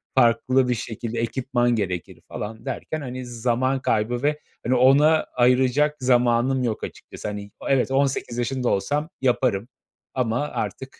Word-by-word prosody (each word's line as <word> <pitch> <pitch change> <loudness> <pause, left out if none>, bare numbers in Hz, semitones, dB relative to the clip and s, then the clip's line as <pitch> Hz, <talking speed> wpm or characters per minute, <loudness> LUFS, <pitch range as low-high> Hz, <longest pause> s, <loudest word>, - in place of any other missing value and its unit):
Farklı 130 +1 +3
bir 125 - +2
şekilde 115 0 -5
ekipman 120 +1 0
gerekir 90 -5 -3
falan 110 +3 -7
derken, 155 +3 -4
hani, 130 -1 -6
zaman 125 +2 0
kaybı 120 +4 0
ve, 150 +1 +1 0.3
hani, 130 - +2
ona 145 +5 +5
ayıracak 130 +4 +3
zamanım 125 +1 +2
yok 115 -3 -2
açıkçası. - - -7
Hani, 105 -1 -6
o - - -6
evet, 135 -1 +2
18 135 -3 0
yaşında 125 +1 -1
olsam 145 +10 0
yaparım 120 -5 +1 0.5
ama 125 -1 0
artık 135 -2 -5
125 Hz, 140 wpm, -24 LUFS, 115-135 Hz, 0.5 s, ona